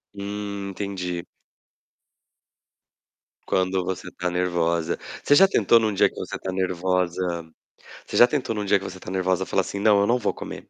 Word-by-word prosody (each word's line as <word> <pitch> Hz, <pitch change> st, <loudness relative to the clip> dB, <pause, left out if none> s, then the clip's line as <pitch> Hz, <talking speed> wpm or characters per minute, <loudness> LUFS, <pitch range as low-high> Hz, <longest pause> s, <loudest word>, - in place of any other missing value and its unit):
Hum, 100 Hz, 0 st, -5 dB
entendi. 90 Hz, -3 st, -4 dB, 2.2 s
Quando 95 Hz, 0 st, 0 dB
você 95 Hz, -1 st, -4 dB
está 90 Hz, 0 st, -3 dB
nervosa. 85 Hz, -2 st, 0 dB, 0.3 s
Você 145 Hz, -, +5 dB
já 195 Hz, +5 st, +7 dB
tentou 115 Hz, -, +4 dB
em 110 Hz, -, 0 dB
um 105 Hz, -, 0 dB
dia -, -, +4 dB
que -, -, -21 dB
você -, -, -5 dB
está 95 Hz, -, -4 dB
nervosa 90 Hz, -2 st, -1 dB, 0.5 s
você -, -, -3 dB
já 120 Hz, -, +8 dB
tentou 130 Hz, -5 st, -1 dB
no 105 Hz, -1 st, -3 dB
dia 100 Hz, -, +4 dB
que 95 Hz, -, -8 dB
você 95 Hz, -, -7 dB
está 90 Hz, -, -10 dB
nervosa 95 Hz, 0 st, 0 dB
falar 95 Hz, -, +1 dB
assim: 100 Hz, +2 st, -5 dB
"Não, 105 Hz, -1 st, +4 dB
eu 100 Hz, -, +2 dB
não 120 Hz, +2 st, +3 dB
vou 105 Hz, -, -1 dB
comer?". -, -, -7 dB
95 Hz, 180 wpm, -24 LUFS, 90-100 Hz, 2.2 s, já